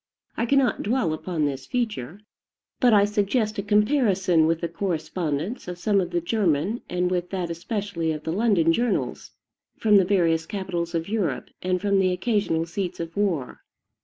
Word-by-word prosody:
I 235 Hz, -, -1 dB
cannot 275 Hz, 0 st, +2 dB
dwell 210 Hz, -8 st, 0 dB
upon 155 Hz, -1 st, -2 dB
this 135 Hz, -2 st, -3 dB
feature; 210 Hz, -, -3 dB, 0.6 s
but 250 Hz, -2 st, +5 dB
I 205 Hz, -2 st, +6 dB
suggest 210 Hz, +1 st, 0 dB
a -, -, +1 dB
comparison 205 Hz, -, +3 dB
with 165 Hz, 0 st, 0 dB
the 170 Hz, -, -1 dB
correspondence 170 Hz, -, -3 dB
of 180 Hz, -1 st, -5 dB
some 200 Hz, +2 st, +2 dB
of 175 Hz, -, -3 dB
the 175 Hz, -1 st, 0 dB
German, 185 Hz, +2 st, 0 dB
and 180 Hz, 0 st, 0 dB
with 180 Hz, -1 st, -1 dB
that 180 Hz, -3 st, -3 dB
especially 175 Hz, -1 st, -3 dB
of 155 Hz, -1 st, -5 dB
the 160 Hz, -, -2 dB
London 190 Hz, -6 st, +3 dB
journals, 240 Hz, +6 st, -1 dB, 0.5 s
from 210 Hz, -2 st, +5 dB
the 195 Hz, -, +5 dB
various 165 Hz, -4 st, +2 dB
capitals 180 Hz, -4 st, -3 dB
of 165 Hz, 0 st, -1 dB
Europe, 195 Hz, -, -2 dB
and 185 Hz, 0 st, 0 dB
from 200 Hz, +1 st, +2 dB
the 185 Hz, -1 st, +3 dB
occasional 180 Hz, -4 st, 0 dB
seats 180 Hz, +2 st, -4 dB
of 165 Hz, 0 st, -5 dB
war. 175 Hz, -11 st, -1 dB
185 Hz, 170 wpm, -25 LUFS, 165-210 Hz, 0.6 s, I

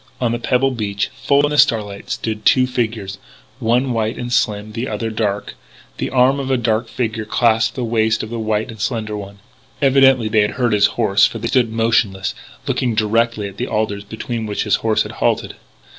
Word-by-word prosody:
On 120 Hz, -2 st, 0 dB
the 120 Hz, -, -2 dB
pebbled 130 Hz, +1 st, +1 dB
beach, 100 Hz, -2 st, -2 dB
full 140 Hz, 0 st, +3 dB
in 145 Hz, -, -2 dB
the 150 Hz, -, +1 dB
starlight, 105 Hz, -7 st, +1 dB
stood 110 Hz, -1 st, -3 dB
two 130 Hz, +3 st, +5 dB
figures, 110 Hz, -6 st, -3 dB, 0.4 s
one 125 Hz, +2 st, +1 dB
white 110 Hz, 0 st, -1 dB
and 120 Hz, 0 st, -4 dB
slim, 105 Hz, -2 st, 0 dB
the 115 Hz, +4 st, -4 dB
other 110 Hz, +1 st, -3 dB
dark. 105 Hz, -2 st, -2 dB, 0.4 s
The -, -, -2 dB
arm 130 Hz, +2 st, +3 dB
of 135 Hz, -, -3 dB
the 135 Hz, -1 st, +1 dB
dark 115 Hz, -1 st, 0 dB
figure 110 Hz, -1 st, -3 dB
clasped 115 Hz, +1 st, +1 dB
the 125 Hz, -, -3 dB
waist 110 Hz, -1 st, +1 dB
of 110 Hz, -, -7 dB
the 120 Hz, -, -3 dB
white 110 Hz, +1 st, -1 dB
and 110 Hz, -2 st, -10 dB
slender 110 Hz, -2 st, -2 dB
one. 100 Hz, -1 st, -8 dB, 0.4 s
Evidently 135 Hz, -4 st, +4 dB
they 110 Hz, 0 st, +3 dB
had 105 Hz, -, +1 dB
heard 120 Hz, -4 st, +1 dB
his 105 Hz, -1 st, +5 dB
horse, 100 Hz, -4 st, +4 dB
for -, -, -7 dB
they 110 Hz, -, -3 dB
stood 120 Hz, -4 st, +2 dB
motionless, 110 Hz, -4 st, +1 dB, 0.3 s
looking 120 Hz, -3 st, 0 dB
directly 110 Hz, 0 st, +1 dB
at 100 Hz, 0 st, -11 dB
the 125 Hz, -, -3 dB
alders 105 Hz, -2 st, -2 dB
behind 110 Hz, +2 st, -5 dB
which 105 Hz, -, -2 dB
his 105 Hz, -3 st, +2 dB
horse 110 Hz, -1 st, +1 dB
had -, -, -8 dB
halted. -, -, 0 dB
110 Hz, 205 wpm, -19 LUFS, 105-120 Hz, 0.4 s, two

